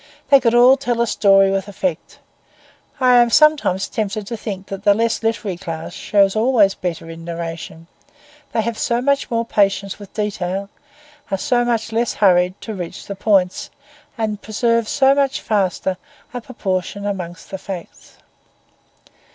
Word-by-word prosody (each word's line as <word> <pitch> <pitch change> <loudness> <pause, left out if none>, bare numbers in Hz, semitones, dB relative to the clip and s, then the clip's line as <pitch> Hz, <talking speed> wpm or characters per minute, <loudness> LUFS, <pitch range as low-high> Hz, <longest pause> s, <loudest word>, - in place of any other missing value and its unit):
They 275 - +8
could 235 -2 +2
all 250 +3 +7
tell 245 -3 -2
a 235 - +3
story 195 -3 +4
with 195 0 -1
effect. 185 -4 -4 0.8
I 250 -1 +5
am 240 -1 +5
sometimes 290 - +3
tempted 215 -2 -3
to 230 - -5
think 200 -3 -6
that 195 0 -7
the 205 -1 +5
less 230 +1 0
literary 225 -5 -2
class 165 -2 -6
show 200 -1 +2
always 215 -3 +3
better 170 -4 -5
in 165 0 -9
narration; 165 -1 -6 0.7
they 225 - +1
have 230 0 -3
so 235 0 0
much 280 +2 0
more 230 -1 -1
patience 200 -2 0
with 200 -2 -12
detail, 195 -2 -3 0.6
are 195 - -1
so 240 +5 +1
much 230 -2 -1
less 230 +1 0
hurried 180 -2 +3
to 220 - -6
reach 175 -4 -7
the 200 - -6
points, 190 -2 +1 0.5
and 215 -2 -2
preserve 230 +1 0
so 270 -1 +4
much 275 -1 0
juster 190 -3 0 0.4
a 245 - -4
proportion 200 -4 -4
among 180 -4 -4
the 190 - -5
facts. 185 -3 -9
205 Hz, 160 wpm, -19 LUFS, 190-235 Hz, 0.8 s, They